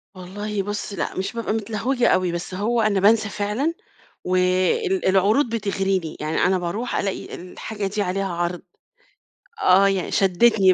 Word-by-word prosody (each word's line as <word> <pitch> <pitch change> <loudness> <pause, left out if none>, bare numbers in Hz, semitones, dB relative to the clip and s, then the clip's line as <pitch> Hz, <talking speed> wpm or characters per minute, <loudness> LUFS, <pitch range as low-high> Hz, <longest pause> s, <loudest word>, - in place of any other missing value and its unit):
والله 200 +2 -4
بُصّ، 205 0 -4
لأ، 185 - -3
مش 190 +5 -2
بابقى 230 -2 -2
متلهوجة 230 +3 0
أوي، 185 -2 +2
بس 175 +2 -5
هو 225 +5 0
أنا 210 -3 +2
بانسى 215 +1 +4
فعلًا، 215 +12 -1 0.5
وال 185 - +1
العروض 205 +8 +3
بتغريني، 195 -5 -1
يعني 155 +1 -2
أنا 185 +1 +3
باروح 190 +8 -3
الاقي 195 -2 -3
الحاجة 200 +3 -6
دي 205 +1 -1
عليها 195 +1 -1
عرض، 175 0 -2 1.0
آه، 195 +2 +5
يعني 195 -2 -1
شدّتني 195 0 +4
195 Hz, 145 wpm, -22 LUFS, 185-220 Hz, 1.0 s, آه